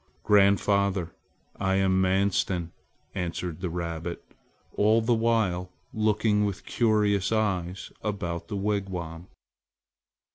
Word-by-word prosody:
"Grandfather, 100 -3 +3 0.5
I 95 0 +1
am 95 -1 +3
Manstin," 95 -2 +1 0.4
answered 90 -1 -4
the 90 - -2
rabbit, 85 0 -4 0.5
all 110 +2 +4
the 115 +2 +2
while 110 -6 +1 0.2
looking 105 -1 +2
with 100 -1 -3
curious 105 -4 +2
eyes 95 -4 -1
about 85 -5 -3
the 100 - -4
wigwam. 95 -4 -3
95 Hz, 100 wpm, -27 LUFS, 90-105 Hz, 0.5 s, all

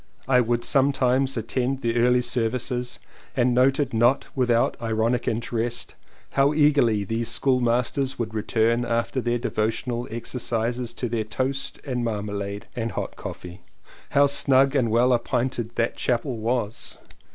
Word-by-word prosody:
I 125 -1 +5
would 120 0 0
sometimes 135 -1 +2
attend 125 +4 -2
the 115 -1 -1
early 125 +1 +3
services 125 +1 -2 0.4
and 125 0 +3
noted 130 +2 +2
not 120 +4 +2
without 120 -3 +2
ironic 115 +1 0
interest 115 +1 -2 0.4
how 140 +2 +2
eagerly 140 -9 +3
these 115 +3 -2
schoolmasters 125 +1 +1
would 110 -2 -3
return 115 +2 +1
after 115 +2 -1
their 120 0 0
devotional 120 +1 -2
exercises 120 +1 -3
to 125 - -2
their 115 -1 -1
toast 130 +6 -3
and 125 -3 -2
marmalade 100 -2 -3
and 115 -1 -3
hot - - -4
coffee. 90 +1 -8 0.5
How 140 0 +4
snug 135 -1 +3
and 125 -4 +2
well 120 +3 +3
appointed 120 -1 -1
that 115 0 0
chapel 125 +1 -1
was! 115 -1 -3
120 Hz, 135 wpm, -24 LUFS, 115-130 Hz, 0.5 s, I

